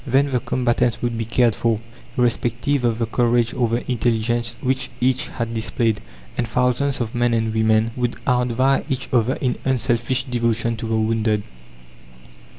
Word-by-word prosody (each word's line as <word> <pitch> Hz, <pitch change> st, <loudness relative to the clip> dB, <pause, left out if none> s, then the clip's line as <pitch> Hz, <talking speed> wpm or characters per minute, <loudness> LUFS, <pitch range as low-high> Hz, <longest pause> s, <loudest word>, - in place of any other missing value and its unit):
Then 140 Hz, +1 st, +2 dB
the 125 Hz, -, +2 dB
combatants 120 Hz, -1 st, 0 dB
would 120 Hz, -1 st, 0 dB
be 115 Hz, 0 st, -2 dB
cared 115 Hz, 0 st, +3 dB
for, 115 Hz, 0 st, 0 dB, 0.4 s
irrespective 125 Hz, +2 st, +1 dB
of 115 Hz, -2 st, +1 dB
the 115 Hz, -, 0 dB
courage 120 Hz, 0 st, +1 dB
or 120 Hz, -2 st, +1 dB
the 120 Hz, +2 st, -2 dB
intelligence 120 Hz, 0 st, 0 dB
which 130 Hz, 0 st, -1 dB
each 130 Hz, +3 st, +1 dB
had 115 Hz, -1 st, -4 dB
displayed, 115 Hz, 0 st, 0 dB, 0.3 s
and 120 Hz, -, -1 dB
thousands 125 Hz, +4 st, +1 dB
of 115 Hz, -2 st, -3 dB
men 120 Hz, -1 st, +2 dB
and 110 Hz, -1 st, 0 dB
women 110 Hz, 0 st, +2 dB
would 120 Hz, -2 st, -1 dB
outvie 125 Hz, +2 st, +2 dB
each 135 Hz, -1 st, -3 dB
other 120 Hz, 0 st, +3 dB
in 125 Hz, -2 st, -1 dB
unselfish 130 Hz, 0 st, 0 dB
devotion 115 Hz, -2 st, 0 dB
to 115 Hz, -, -5 dB
the 110 Hz, -, 0 dB
wounded. 110 Hz, -1 st, +1 dB
120 Hz, 160 wpm, -21 LUFS, 115-125 Hz, 0.4 s, cared